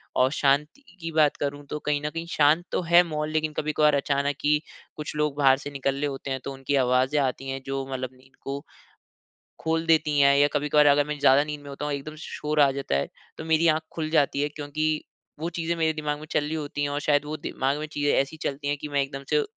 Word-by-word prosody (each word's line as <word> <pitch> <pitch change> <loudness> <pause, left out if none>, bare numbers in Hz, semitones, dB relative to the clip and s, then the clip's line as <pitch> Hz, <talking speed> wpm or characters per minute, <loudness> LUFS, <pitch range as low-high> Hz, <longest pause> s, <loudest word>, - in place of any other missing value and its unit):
और 130 +1 +3
शांति 150 - +1 0.2
की 165 0 -4
बात 155 -2 +3
करूँ 145 0 -3
तो 150 - -3
कहीं 150 -1 -1
न - - 0
कहीं 165 +2 -5
शांत 155 +3 +4
तो - - 0
है 170 +1 +6
माहौल 155 -2 -3
लेकिन 155 -1 -1
कभी-कभार 150 0 +2
अचानक 140 0 0
ही 150 0 +4 0.4
कुछ 150 0 -6
लोग 150 -1 0
बाहर 135 -2 +5
से 145 - -7
निकल 135 -1 -1
ले 145 +1 -1
होते 135 -1 -5
हैं 130 - -1
तो 140 - -5
उनकी 135 +1 -2
आवाज़ें 130 +4 +2
आती 135 0 -2
हैं 135 0 -4
जो 135 0 -3
मतलब 130 -1 -3
नींद 130 +1 -23
को, 140 +1 -4 1.0
खोल 160 0 -1
देती 155 -3 +3
हैं। 140 0 +6
या 145 0 +5
कभी-कभार 150 0 +3
अगर 145 0 +5
मैं 150 -1 -4
ज़्यादा 140 +1 +5
नींद 150 -1 -6
में 145 - -11
होता 140 +1 -5
हूँ 150 - -1
एकदम 145 +2 -6
श - - -13 0.2
शोर 150 0 -1
आ 140 - +5
जाता 135 - -2
है, 70 - 0 0.3
तो 160 - -7
मेरी 160 +1 +3
आँख 155 0 +3
खुल 155 -1 -3
जाती 145 -3 +2
है 145 - 0
क्योंकि 150 +1 -2 0.4
वो 165 +2 -2
चीज़ें 170 0 -2
मेरे 160 -1 +1
दिमाग 150 -1 -3
में 155 - -9
चल - - +2
रही 150 +2 -4
होती 145 -2 -4
हैं 145 - 0
और 145 +1 -2
शायद 145 -1 +2
वो 150 +1 -4
दिमाग 135 -1 -1
में 155 - -3
चीज़ें 145 -1 +1
ऐसी 140 +4 0
चलती 145 +1 -3
हैं 145 0 0
कि 150 - -6
मैं 145 -1 +1
एकदम 135 0 -5
से, 445 - +3
145 Hz, 250 wpm, -26 LUFS, 140-155 Hz, 1.0 s, है